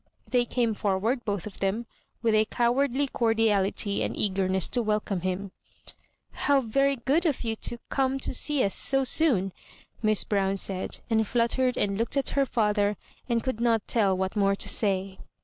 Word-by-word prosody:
They 245 -1 +1
came 235 -2 0
forward, 210 +5 -1
both 200 -4 -2
of 210 - -9
them, 200 +5 -1 0.4
with 225 -1 +2
a 215 0 +4
cowardly 255 +4 +1
cordiality 220 -5 0
and - - -3
eagerness 190 -2 +1
to 245 - +1
welcome 210 -4 -1
him 185 +2 -3 0.4
— - - -36 0.2
How 285 -1 +5
very 275 +3 +1
good 275 +7 0
of 290 -5 -1
you 225 -1 -2
to 240 - -1
come 270 -1 0
to - - -1
see 290 +1 +1
us 195 - 0
so 270 0 +2
soon 265 - +3
1 195 - -5 0.3
" - - -32
Miss 215 -2 +3
Brown 195 -1 0
said, 190 -1 0
and 220 -1 +2
fluttered 245 +2 +1
and 200 0 0
looked 235 +4 0
at 275 - +1
her 275 -1 +1
father, 210 -3 +1 0.3
and 230 -1 0
could 260 -3 -3
not 230 -3 +1
tell 200 -5 +2
what 190 +2 -2
more 200 -1 +2
to - - -1
say. 190 -2 0
220 Hz, 185 wpm, -26 LUFS, 195-250 Hz, 0.4 s, How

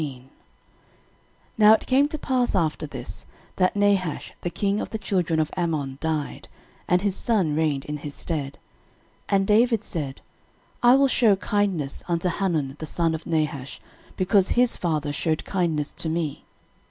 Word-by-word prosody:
13:019:001 135 -5 -5 1.4
Now 215 0 +8
it 220 - +1
came 270 +2 +3
to 310 - -4
pass 255 -5 0
after 155 -3 0
this, - - -8 0.3
that 185 +1 +2
Nahash 200 -5 +1
the 175 - -2
king 200 +3 -1
of - - -5
the 220 - -3
children 180 -6 0
of 155 - 0
Ammon 155 -7 -2
died, 155 -3 -3 0.4
and 180 +1 +2
his 200 -2 0
son 195 -12 +1
reigned 150 -3 0
in 150 0 -4
his 145 0 -8
stead. 145 -5 -4 0.7
13:019:002 - - +3
And 195 0 +3
David 225 +1 +3
said, 145 -8 -5 0.6
I 245 +1 +7
will 275 0 +5
shew 230 -6 +4
kindness 190 -8 -1
unto 170 +1 0
Hanun 160 -7 -1
the 155 - -5
son 165 +1 0
of 160 - -6
Nahash, 150 -4 -2 0.4
because 190 +1 +3
his 245 -1 +3
father 155 -4 -1
shewed 155 +1 -1
kindness 165 -6 -1
to 160 - -3
me. 160 -3 -3
170 Hz, 165 wpm, -24 LUFS, 150-205 Hz, 1.4 s, Now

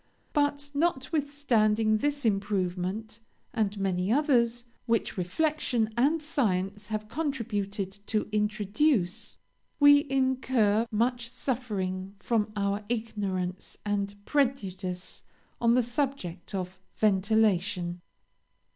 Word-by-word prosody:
But, 290 -1 +1
notwithstanding 265 -8 +2
this 285 +2 -1
improvement, 200 +1 -1 0.3
and 210 -2 0
many 190 0 0
others 240 -4 +2 0.2
which 230 -2 +1
reflection 225 - 0
and 295 +6 +2
science 205 - -1
have 215 -1 -3
contributed 210 -8 -3
to 215 -1 0
introduce, 210 - 0 0.4
we 285 0 +7
incur 260 -5 +2
much 235 +2 0
suffering 200 -7 -3
from 215 -1 0
our 200 +1 0
ignorance 200 -6 -3
and 205 -1 -1
prejudice 195 -10 -1 0.4
on 235 0 +4
the 250 - +4
subject 240 - -3
of 185 0 -4 0.2
ventilation. 195 -4 +2
215 Hz, 95 wpm, -28 LUFS, 195-260 Hz, 0.4 s, we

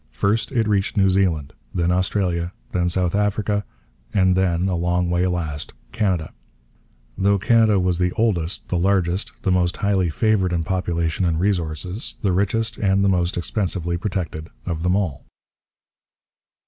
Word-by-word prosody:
First 105 - 0
it 115 -4 +1
reached 100 -1 0
New 95 -1 +4
Zealand, 90 -7 +1 0.2
then 85 0 +1
Australia, 90 -1 0 0.2
then 90 -1 +1
South 90 -1 0
Africa, 105 0 0 0.5
and 95 -2 +3
then, 90 -1 +1
a 95 - 0
long 85 +1 0
way 90 +1 +2
last, 80 -5 -3 0.2
Canada; 90 - -1 0.8
though 100 +1 +2
Canada 110 0 +4
was 90 -1 +1
the 90 -1 +2
oldest, 95 -7 0
the 90 - 0
largest, 95 0 +1
the 95 - +1
most 90 0 +1
highly 100 -4 +1
favoured 95 +1 +1
in 85 -1 0
population 85 -1 -1
and 85 -3 +1
resources, 90 - -2
the 100 - +2
richest, 110 +4 0
and 100 -1 +2
the - - +4
most 90 -2 +1
expensively 90 -2 -1
protected 85 -4 -4 0.2
of 85 -3 -3
them 90 +2 +2
all. 80 -9 -1
90 Hz, 150 wpm, -22 LUFS, 85-100 Hz, 0.8 s, New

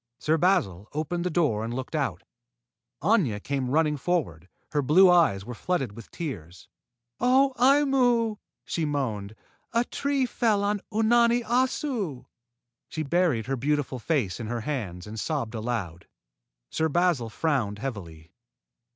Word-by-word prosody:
Sir 155 +6 +1
Basil 150 - +1
opened 165 +3 -2
the - - +1
door 150 -11 +1
and 115 - -4
looked 130 0 -5
out. - - -2 0.8
Aña 170 - +2
came 135 -3 -2
running 150 +1 +2
forward. 130 - -2 0.2
Her 150 - +1
blue 180 +7 +6
eyes 130 - +3
were 125 - -6
flooded 135 - -2
with 115 +3 -12
tears. 90 - -7 0.5
"Oh, 265 +2 +4
Aimu!" 250 -5 +3 0.3
she 165 - -2
moaned. 115 -9 -2 0.4
"A 235 0 +3
tree 280 0 0
fell 220 -4 +1
on 205 0 0
Unani 235 +2 +3
Assu." 240 - -1 0.6
She 155 - -3
buried 155 -7 +1
her 135 +2 -1
beautiful 140 0 -1
face 120 - -1
in 115 - -5
her 120 +1 -3
hands 105 -10 -4
and 110 +1 -7
sobbed 135 -7 -2
aloud. 110 -7 -4 0.6
Sir 160 0 0
Basil 165 -7 +1
frowned 120 -6 -1
heavily. 90 -9 -7
150 Hz, 140 wpm, -26 LUFS, -, 0.8 s, blue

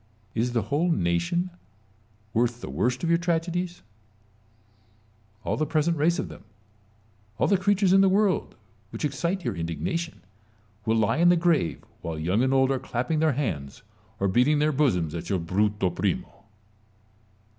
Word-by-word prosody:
Is 120 +2 0
the 115 -3 +1
whole 145 +11 0
nation 90 - 0 0.8
worth 120 +1 +1
the - - -7
worst 125 +2 0
of 165 - 0
your 170 0 +4
tragedies? 175 +1 -2 1.6
All - - -1
the 155 - 0
present 160 +2 +1
race 165 +3 +2
of - - -2
them, - - -12 0.9
all - - +2
the 200 - +4
creatures 195 0 +2
in 195 - +6
the 195 - +5
world 195 -2 +1 0.3
which - - -4
excite 170 +6 -2
your - - -1
indignation, 85 - -3 0.6
will 110 0 +3
lie 110 +4 +2
in 175 +1 +5
the 175 - +5
grave, 165 - +1 0.2
while 80 -1 -4
young 90 +8 +1
and 130 +1 +2
old 135 0 +3
are 135 - 0
clapping 125 +8 -2
their 155 -2 +3
hands 80 - -3 0.4
or 100 - +1
beating 125 +10 +3
their 150 +1 +2
bosoms 110 - +1
at 85 +1 -5
your 95 - +1
Bruto 95 +2 0
Primo. - - -3
140 Hz, 160 wpm, -26 LUFS, 105-170 Hz, 1.6 s, in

